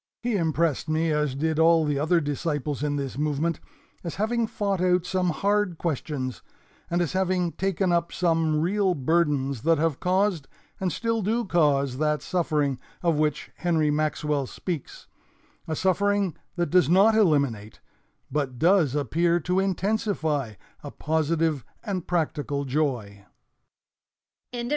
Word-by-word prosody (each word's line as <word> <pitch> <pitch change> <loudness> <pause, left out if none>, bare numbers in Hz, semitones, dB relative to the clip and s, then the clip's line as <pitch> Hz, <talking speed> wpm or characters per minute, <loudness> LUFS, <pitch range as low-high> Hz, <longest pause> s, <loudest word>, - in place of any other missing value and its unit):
He 240 -2 0
impressed 160 -4 0
me, 160 +1 +1
as 150 -3 0
did 160 +2 -1
all 165 0 +5
the 145 -2 0
other 160 +4 +3
disciples 145 -2 -2
in 145 -1 0
this 140 -1 -4
movement, 150 +2 0 0.4
as 170 - -5
having 225 +3 0
fought 200 -4 -2
out 180 -1 +2
some 185 0 0
hard 200 +1 0
questions, 145 -5 -3 0.5
and 175 +1 +1
as 170 - -3
having 185 -2 0
taken 190 0 -1
up 170 0 +1
some 165 -3 +1
real 190 +2 +1
burdens 140 -4 +1
that 165 +3 +3
have 155 -2 0
caused 185 -4 +1 0.3
and 185 -2 -1
still 230 +2 -1
do 225 +4 0
cause 140 -7 +1
that 150 -1 0
suffering 150 -7 0 0.2
of 165 -3 +2
which 150 -1 -1
Henry 160 -4 +1
Maxwell 150 -2 -1
speaks, 170 -1 -6 0.6
a 160 - -2
suffering 200 +1 +1 0.2
that 175 -1 -1
does 180 -5 +4
not 195 +5 +5
eliminate, 140 - +1 0.5
but 135 -3 -2
does 165 -3 +3
appear 170 +5 +1
to 180 +4 0
intensify, 190 - -1 0.3
a - - -6
positive 160 -2 0 0.2
and 190 -6 -4
practical 150 -4 -1
joy." 125 -8 -2
165 Hz, 140 wpm, -25 LUFS, 145-180 Hz, 0.6 s, all